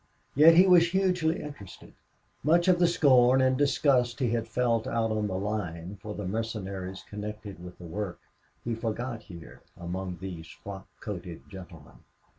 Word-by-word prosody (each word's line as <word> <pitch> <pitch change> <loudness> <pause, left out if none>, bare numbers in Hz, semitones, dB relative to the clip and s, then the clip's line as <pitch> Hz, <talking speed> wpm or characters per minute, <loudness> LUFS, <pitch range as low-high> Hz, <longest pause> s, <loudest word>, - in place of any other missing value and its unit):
Yet 160 +4 +7
he 180 +3 +8
was 175 -2 +6
hugely, 180 -3 +1
interested. 145 -11 -11 0.5
Much 170 +4 +3
of 180 -1 +4
the 175 - +5
scorn 130 -6 +5
and 130 0 +3
disgust 130 -3 +2
he 125 -4 0
had 115 -1 -1
felt 115 -1 0
out 115 -1 0
on 105 -1 0
the 95 - -3
line 95 -2 -4
for 105 0 -6
the 105 - -5
mercenaries 95 -3 -4
connected 105 -3 -7
with 90 0 -10
the 90 - -11
work 90 +2 -5 0.4
he 120 - -2
forgot 115 +1 -3
here 85 -6 -12 0.2
among 90 +1 -5
these 90 -4 -7
frock 95 -1 -10
coated 90 -5 -7
gentlemen. 90 -5 -12
110 Hz, 160 wpm, -28 LUFS, 95-130 Hz, 0.5 s, he